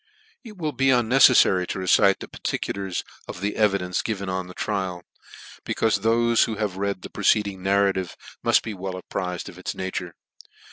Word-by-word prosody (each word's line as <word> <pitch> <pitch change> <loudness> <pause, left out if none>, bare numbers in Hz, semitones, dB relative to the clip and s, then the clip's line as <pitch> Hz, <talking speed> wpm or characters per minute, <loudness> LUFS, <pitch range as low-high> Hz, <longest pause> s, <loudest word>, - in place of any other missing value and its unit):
It 215 -5 -12
will 155 -4 -2
be 135 -2 0
unmcefTaiy 125 -7 +5
to - - -4
recite 95 +1 +3
the - - -6
particulars 95 -2 -3 0.2
of - - -7
the 100 +2 -2
evidence 100 -4 +1
given 100 -4 -3
on 95 -1 -3
the 90 - -12
trial, 95 -4 -3 0.6
becauie 110 -2 0
thofe 115 +1 +3
who 110 - -4
have 105 -3 -3
read 100 -1 -2
the - - -7
preceding 100 -3 +1
narrative 95 -2 +1 0.2
mutt - - +3
be 110 - -5
well 95 -1 -5
apprized 90 -1 -4
of - - -10
its - - -5
nature. 90 -2 -5
100 Hz, 170 wpm, -24 LUFS, 95-110 Hz, 0.6 s, unmcefTaiy